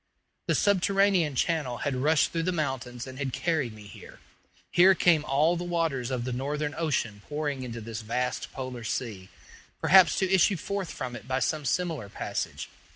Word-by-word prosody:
The - - +2
subterranean 195 -5 +3
channel 140 -4 0
had 145 - 0
rushed 150 +4 +2
through 165 - -1
the - - +1
mountains 130 -6 -3
and 130 0 -9
had 135 -2 -2
carried 155 -5 -1
me 105 -1 -12
here. - - -12 0.5
Here 185 +2 +6
came 170 -4 +4
all 150 +6 +3
the 175 - -3
waters 165 -8 -1
of 125 -2 -2
the 125 0 -3
Northern 145 +4 -2
ocean 120 -10 -1
pouring 145 -2 -2
into 120 -2 -6
this 110 0 -6
vast 125 +3 -2
polar 130 -3 -6
sea, 110 -5 -4 0.5
perhaps 185 -3 +6
to 190 -1 +1
issue 190 +1 +4
forth 200 +1 -4
from 125 -3 -5
it 115 0 -10
by 130 0 0
some 150 +2 -1
similar 160 - -1
passage. - - -4
145 Hz, 175 wpm, -28 LUFS, 125-170 Hz, 0.5 s, Here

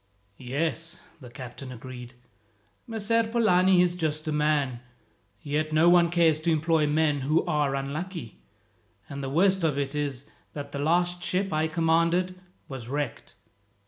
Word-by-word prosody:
"Yes," 160 +6 -3 0.2
the 125 -4 -11
captain 130 +1 -9
agreed. 125 0 -9 0.7
"Messer 225 0 +1
Polani 190 -5 +4
is 175 -1 +1
a - - -10
just 155 -2 -2
man, 150 -4 0 0.6
yet 155 +2 -1
no 160 +2 +5
one 175 -1 +5
cares 165 -3 +3
to 165 +2 -1
employ 160 -1 +2
men 150 -1 +2
who 150 +5 +1
are 150 -5 0
unlucky; 140 - -5 0.7
and 140 0 -6
the 135 - -3
worst 185 +5 +2
of 150 -4 +1
it 140 0 -2
is 140 -3 -3 0.3
that 140 -1 -7
the 140 - -5
last 175 +4 +1
ship 190 0 -1
I 155 +1 +1
commanded 170 +3 +1 0.3
was 130 -4 -7
wrecked. 145 -1 -4
155 Hz, 145 wpm, -27 LUFS, 140-175 Hz, 0.7 s, no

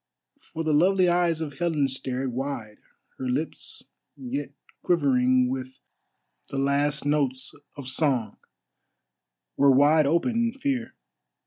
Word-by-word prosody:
For 165 - -6
the 155 -1 +1
lovely 185 +4 +4
eyes 175 -2 +2
of 150 -2 -6
Helen 160 -5 +1
stared 130 -1 -1
wide, 125 -5 -5 0.4
her 130 - -3
lips, 150 +6 -3 0.3
yet 135 +2 -4 0.3
quivering 130 -6 +3
with 130 0 -5 0.7
the 140 - -5
last 140 +2 +1
notes 140 -3 0 0.2
of 140 -3 -7
song, 130 -6 0 1.2
were 140 - +5
wide 145 +3 +5
open 170 - +1
in 235 0 +1
fear. 265 -4 -2
140 Hz, 120 wpm, -26 LUFS, 130-165 Hz, 1.2 s, were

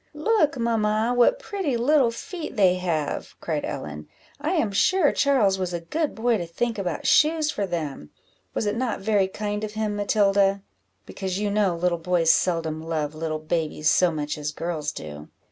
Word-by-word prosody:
"Look, 310 -3 +2
mamma! 225 0 +1
what 245 - +4
pretty 385 - -2
little 265 +1 +3
feet 310 +8 -7
they 190 -5 +5
have," 165 -5 -2
cried - - -2
Ellen; 75 0 -6 0.3
"I - - -1
am 205 - +1
sure 315 - +3
Charles 230 -9 +2
was 180 -1 -2
a - - -2
good 300 - -2
boy 230 -1 +1
to 170 - -4
think 225 +6 -2
about 180 -5 -3
shoes 310 0 +4
for 200 -7 -2
them 150 - -4 0.5
was - - -1
it 205 0 0
not 235 -4 -2
very 200 -2 +2
kind 210 +2 -4
of 215 -1 -4
him, 215 -1 -2
Matilda? 200 -1 +2 0.4
because 190 -1 -4
you 205 0 -1
know 200 -4 +2
little 170 0 0
boys 165 -1 +3
seldom 165 -3 0
love 160 -2 -2
little 155 0 -3
babies 155 -1 0
so 180 -2 +4
much 150 -1 -3
as 150 0 -3
girls 155 -2 -3
do." 75 - -9
195 Hz, 180 wpm, -24 LUFS, 165-230 Hz, 0.5 s, they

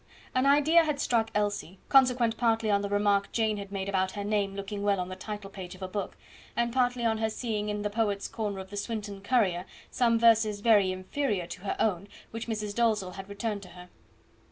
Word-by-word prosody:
An 255 +2 +2
idea 295 +4 +5
had 300 -3 -1
struck 225 -2 +1
Elsie, 205 -3 -1
consequent 250 -4 +4
partly 225 -2 +1
on 200 0 +3
the 200 - -3
remark 205 -1 +2
Jane 220 -2 +1
had 200 -1 -7
made 195 -1 -3
about 190 -1 0
her 205 - -4
name 200 -1 0
looking 200 +1 -5
well 200 -1 +2
on 180 0 -3
the 185 - -5
title 205 +1 -7
page 185 -2 -8
of 185 - -10
a - - -2
book, 200 +2 -4 0.4
and 235 0 0
partly 245 -1 +1
on 220 -1 +1
her 220 0 +1
seeing 215 -2 -3
in 210 0 -2
the 210 - 0
Poet's 205 -2 0
Corner 210 -3 -3
of 190 0 -8
the 205 - -6
SWINTON 205 -2 -4
COURIER 200 -6 +1 0.3
some 235 -2 +3
verses 225 -3 +4
very 205 -4 +5
inferior 185 +1 -2
to 180 - -9
her 200 - -2
own 200 -2 0 0.2
which 225 +1 -5
Mrs. 215 -2 -3
Dalzell 215 -5 +1
had 195 +1 -9
returned 205 0 -3
to 185 - -12
her. 180 +1 -13
210 Hz, 215 wpm, -29 LUFS, 195-230 Hz, 0.4 s, idea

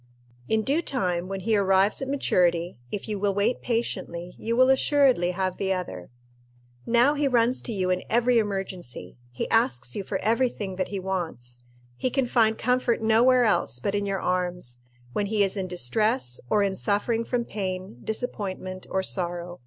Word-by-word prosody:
In 220 0 +1
due 285 +8 +1
time, 180 - -1
when 195 0 -4
he 220 +3 +1
arrives 195 +2 +3
at 270 - -3
maturity, 175 - +1
if 205 - -4
you 210 -2 -3
will 200 -1 0
wait 210 +5 +1
patiently, 180 -7 -3
you 230 +1 -1
will 255 +1 +6
assuredly 265 -8 +3
have 185 0 -2
the 195 -1 -1
other. 95 - -5 0.8
Now 240 +5 +4
he 290 -1 +1
runs 245 -1 +2
to 240 - -5
you 185 -4 0
in 180 - 0
every 240 +1 +3
emergency. 185 - -4
He 120 - -4
asks 130 - +1
you 200 - -3
for 190 - -2
every 230 +3 +3
thing 195 -5 -6
that 185 - -1
he 200 - -4
wants. 160 -11 -5 0.3
He 255 - 0
can 265 +1 +1
find 225 -2 +2
comfort 250 -1 +1
nowhere 240 +3 +5
else 200 - +1
but 195 +11 -2
in 205 0 -1
your 195 -1 -1
arms, 180 -9 -1 0.3
when 205 - 0
he 210 0 +2
is 195 0 0
in 190 -2 -2
distress 180 - 0
or 210 -1 +3
in 195 -1 0
suffering 215 +4 0
from 240 0 -1
pain, 185 - -5
disappointment, 190 -5 -4
or 190 - 0
sorrow. 175 -1 -2
200 Hz, 180 wpm, -26 LUFS, 180-230 Hz, 0.8 s, will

